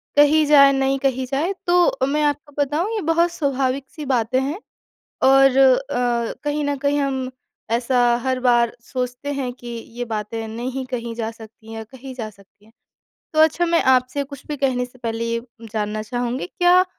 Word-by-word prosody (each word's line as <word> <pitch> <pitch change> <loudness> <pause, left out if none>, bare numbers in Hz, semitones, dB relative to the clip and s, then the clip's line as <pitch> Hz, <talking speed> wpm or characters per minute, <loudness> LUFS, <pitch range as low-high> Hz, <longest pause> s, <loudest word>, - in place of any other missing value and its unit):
कही 295 +1 +5
जाए, 280 -2 +7
नहीं 270 0 +1
कही 260 -1 0
जाए 285 +9 -1
तो 350 -6 +3
मैं 300 +2 +1
आपको 290 0 -1
बताऊँ 300 +8 0
ये 425 - -1
बहुत 335 +2 +2
स्वाभाविक-सी 275 -1 -2
बातें 255 -1 +1
हैं। 290 +8 -3 0.6
और 270 0 +6
अ, 250 -3 +2
कहीं 295 0 -1
न 285 0 -1
कहीं 285 +1 +1
हम 265 -2 -2 0.4
ऐसा 245 +2 +1 0.3
हर 260 -1 0
बार 240 -2 +3
सोचते 250 +3 -4
हैं 265 -3 -3
कि 245 -1 -14
ये 235 +1 -6
बातें 225 0 -4
नहीं 250 +4 -4
कही 235 -2 -4
जा 225 -1 -3
सकतीं 220 -1 -15
है - - -6
या 220 - -6
कही 260 +3 -11
जा 225 -4 -5
सकतीं 200 0 -23
है। 220 - -22 0.6
तो 310 - -2
अच्छा 320 +2 +4
मैं 335 0 +2
आपसे 260 +2 +2
कुछ 280 0 -12
भी 295 - -4
कहने 260 -2 0
से 250 +1 -21
पहले 230 -1 -3
ये 230 - -1 0.3
जानना 215 -1 -2
चाहूँगी 245 +3 -3
क्या 360 +1 +4
260 Hz, 180 wpm, -21 LUFS, 240-285 Hz, 0.6 s, जाए